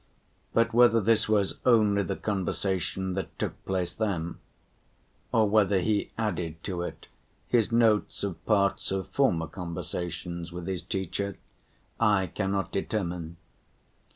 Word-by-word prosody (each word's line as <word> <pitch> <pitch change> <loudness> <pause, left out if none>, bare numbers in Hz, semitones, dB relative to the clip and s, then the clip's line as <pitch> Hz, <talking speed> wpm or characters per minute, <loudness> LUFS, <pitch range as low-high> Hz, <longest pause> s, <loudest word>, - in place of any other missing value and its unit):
But 115 0 +2
whether 120 -1 +6
this 110 0 +2
was 105 -3 +1
only 105 -4 +4
the - - -2
conversation 95 -2 -1
that 95 +1 -4
took - - -4
place 90 -2 -1
then, 90 -6 -2 0.9
or 110 -2 +4
whether 100 -2 +4
he 105 +3 0
added 85 -7 -2
to 90 -3 -3
it 90 - -6 0.4
his 120 -2 +2
notes 115 -4 +3
of 90 -4 -4
parts 100 -3 +2
of 95 0 -2
former 90 -13 +2
conversations 85 0 -5
with 90 0 -6
his 95 -3 -2
teacher, 95 +2 -3 0.6
I 105 -4 +4
cannot 95 -3 -1
determine. 85 -5 -3
95 Hz, 125 wpm, -28 LUFS, 90-110 Hz, 0.9 s, whether